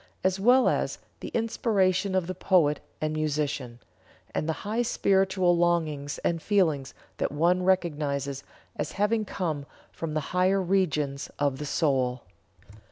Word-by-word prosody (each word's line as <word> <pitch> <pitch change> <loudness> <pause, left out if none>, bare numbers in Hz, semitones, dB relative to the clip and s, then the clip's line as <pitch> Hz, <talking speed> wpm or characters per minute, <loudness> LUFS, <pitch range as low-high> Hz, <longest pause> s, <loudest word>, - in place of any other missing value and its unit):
as 190 0 +1
well 250 +6 +5
as - - 0 0.2
the - - -6
inspiration 200 -4 +1
of 185 -2 +1
the 185 - -4
poet 170 -5 +2 0.2
and 155 0 -1
musician, 145 -5 -2 0.5
and 155 - -1
the 160 - -4
high 220 +3 0
spiritual 190 -5 +2
longings 160 -5 0
and 165 -1 0
feelings 160 -10 +1 0.2
that - - -1
one 170 +5 +2
recognizes 145 -7 0 0.3
as - - -4
having 215 +2 +1
come 160 -7 -3 0.3
from 160 -2 -5
the - - +2
higher 185 +2 +3
regions 155 -7 0
of 140 -2 0
the 150 - -4
soul. 130 -5 0
170 Hz, 140 wpm, -27 LUFS, 145-190 Hz, 0.5 s, well